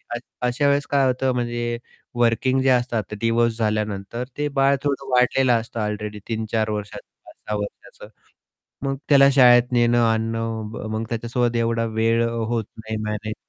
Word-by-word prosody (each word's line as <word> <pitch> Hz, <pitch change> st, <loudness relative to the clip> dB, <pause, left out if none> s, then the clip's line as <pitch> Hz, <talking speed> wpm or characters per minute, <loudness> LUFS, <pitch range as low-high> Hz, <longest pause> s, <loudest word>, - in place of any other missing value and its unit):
अ -, -, -1 dB, 0.3 s
अशा 135 Hz, +4 st, +1 dB
वेळेस 140 Hz, 0 st, +2 dB
काय 140 Hz, -2 st, +2 dB
होतं 130 Hz, +1 st, +1 dB
म्हणजे, 120 Hz, -1 st, -2 dB, 0.4 s
वर्किंग 120 Hz, +3 st, +2 dB
जे 135 Hz, -, +2 dB
असतात 125 Hz, -2 st, +2 dB
आता 105 Hz, -, -8 dB
डिव्होर्स 115 Hz, 0 st, +1 dB
झाल्यानंतर, 105 Hz, +1 st, -2 dB
ते 150 Hz, -, 0 dB
बाळ 135 Hz, +1 st, +4 dB
थोडं 140 Hz, -1 st, -2 dB
वाढलेलं 125 Hz, 0 st, +3 dB
असतं 115 Hz, 0 st, -7 dB
ऑलरेडी 105 Hz, 0 st, -4 dB
3-4 110 Hz, -1 st, -1 dB
वर्षाचं, 105 Hz, -1 st, -5 dB, 0.2 s
5-6 105 Hz, -, -7 dB
वर्षाचं, 105 Hz, 0 st, -8 dB, 0.8 s
मग 135 Hz, 0 st, -1 dB
त्याला 140 Hz, -1 st, +7 dB
शाळेत 125 Hz, -2 st, +6 dB
नेणं-आणणं, 115 Hz, -1 st, +1 dB
म -, -, -6 dB
मग 110 Hz, -, -2 dB
त्याच्यासोबत 120 Hz, +1 st, -1 dB
एवढा 115 Hz, 0 st, 0 dB
वेळ 115 Hz, +1 st, +2 dB
अ, -, -, -2 dB
होत 115 Hz, -1 st, -2 dB
नाही 110 Hz, 0 st, -5 dB
मॅनेज. 105 Hz, +1 st, -4 dB
115 Hz, 155 wpm, -22 LUFS, 110-125 Hz, 0.8 s, त्याला